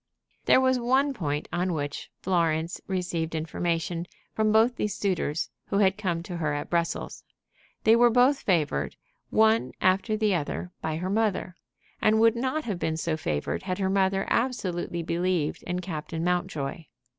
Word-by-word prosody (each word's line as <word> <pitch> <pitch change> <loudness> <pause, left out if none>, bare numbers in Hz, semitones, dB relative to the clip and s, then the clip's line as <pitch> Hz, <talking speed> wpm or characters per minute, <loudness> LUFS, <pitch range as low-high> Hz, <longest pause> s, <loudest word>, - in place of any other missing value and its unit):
There - - +6
was 260 -1 +3
one 265 +4 +2
point 150 - -2
on 180 +1 0
which 145 -2 -4
Florence 165 -2 0
received 175 -4 -2
information 165 +1 -2 0.3
from 215 -1 +2
these 225 +3 +5
two - - 0
suitors 185 -6 -1 0.2
who 200 - 0
had 195 -2 +4
come 175 -5 -2
to 175 -1 -6
her 150 -3 -1
at 145 - -5
Brussels. 170 -1 -1 0.6
They 225 - +6
were 240 +1 +6
both 255 +4 +4
favored, 165 -6 0 0.3
one 220 +1 +3
after 195 +4 +2
the 215 -2 +2
other, 175 +2 -3
by 160 -1 -2
her 180 +3 -3
mother; 205 -4 0 0.5
and 215 +1 +4
would 225 0 +5
not 260 +6 -1
have 200 -6 -3
been 160 -2 -1
so 160 0 -1
favored 75 - -2
had 185 -1 -3
her 190 -1 0
mother 195 0 +2
absolutely 180 -8 -1
believed 170 -2 0
in 180 +1 -2
Captain 160 -2 -4
Mountjoy. 175 -4 -2
180 Hz, 160 wpm, -27 LUFS, 165-215 Hz, 0.6 s, There